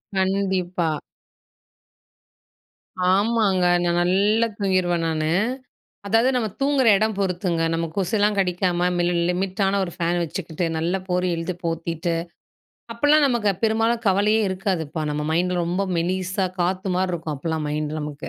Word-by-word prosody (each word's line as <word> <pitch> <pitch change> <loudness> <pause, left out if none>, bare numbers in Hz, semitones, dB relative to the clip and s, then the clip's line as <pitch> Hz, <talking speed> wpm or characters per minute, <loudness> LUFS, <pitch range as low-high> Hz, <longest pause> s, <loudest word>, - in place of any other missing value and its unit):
கண்டிப்பா. 190 -3 0 2.2
ஆமாங்க, 200 -3 +2 0.2
நான் 175 0 +1
நல்லா 205 +6 +2
தூங்கிருவேன் 185 -3 +1
நானு. 155 -1 -1 0.8
அதாவது 225 +5 +3
நம்ம 235 -3 +1
தூங்கிற 275 -3 +2
எடம் 215 0 0
பொறுத்துங்க 180 -3 0
நம்ம 165 0 -1
கொசுலாம் 205 +2 +1
கடிக்காம 180 -1 +1 0.4
லிமிட்டான 195 +2 0
ஒரு 175 - -5
ஃபேன் 175 +1 0
வச்சுக்கிட்டு 165 +1 -4
நல்ல 165 +3 -1
போர்வைய 180 -1 0
இழுதி 170 +2 -3
போத்திட்டு. 165 +1 -2 0.8
அப்பலாம் 290 +5 +4
நமக்கு 235 -5 +1
பெரும்பாலும் 225 +1 +1
கவலையே 205 +3 +3
இருக்காதுப்பா. 180 -5 -2
நம்ம 150 0 -2
மைண்டில் 175 +2 +1
ரொம்ப 175 +3 -1
மெலிசா 185 +3 -1 0.2
காத்து 185 +2 -1
மாரி 185 +1 0
இருக்கும். 160 -3 -3
அப்போலாம் 160 +2 -3
மைண்டு 150 0 -2
நமக்கு. 150 0 -6
185 Hz, 120 wpm, -23 LUFS, 170-200 Hz, 2.2 s, அப்பலாம்